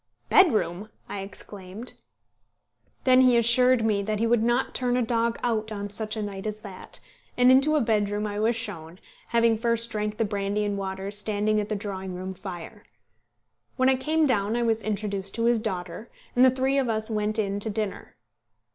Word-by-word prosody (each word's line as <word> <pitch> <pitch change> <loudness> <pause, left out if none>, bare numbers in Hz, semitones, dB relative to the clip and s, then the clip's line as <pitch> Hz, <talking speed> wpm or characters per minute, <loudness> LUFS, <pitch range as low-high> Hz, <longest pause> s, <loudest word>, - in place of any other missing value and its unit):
"Bedroom!" 215 - +3 0.2
I 200 - -5
exclaimed. 195 +2 -7 1.1
Then 255 0 +6
he 250 -2 +5
assured 240 0 +4
me 210 -2 +2
that 215 +1 -2
he 225 - +1
would 235 -1 +3
not 240 +3 +1
turn 250 -1 0
a 250 - +2
dog 230 0 0
out 220 -2 0
on 205 -1 -5
such 215 +1 -3
a 215 - -2
night 200 0 -5
as 215 0 -5
that, 195 -4 -7 0.4
and 250 +1 +6
into 275 +4 +5
a 300 - +3
bedroom 210 -2 0
I 205 0 -3
was 225 +2 +2
shown, 180 -7 -6 0.3
having 230 -1 +2
first 230 0 +1
drank 210 -1 -2
the 225 - +1
brandy 205 0 -1
and 205 -1 -1
water 195 0 -4
standing 210 +1 0
at 210 - -3
the 215 - -1
drawing 190 -2 -5
room 185 +1 -5
fire. 190 +2 -9 0.9
When 260 0 +3
I 265 - +4
came 310 +4 +1
down 215 -5 +1
I 240 - +1
was 225 -1 +1
introduced 200 -2 -3
to 230 0 0
his 235 -1 +3
daughter, 195 0 -5 0.3
and 250 - +5
the 260 - +8
three 265 +2 +1
of 260 -3 0
us 220 0 0
went 215 0 -1
in 200 -2 -1
to 220 - -3
dinner. 210 -1 -4
215 Hz, 190 wpm, -26 LUFS, 200-235 Hz, 1.1 s, the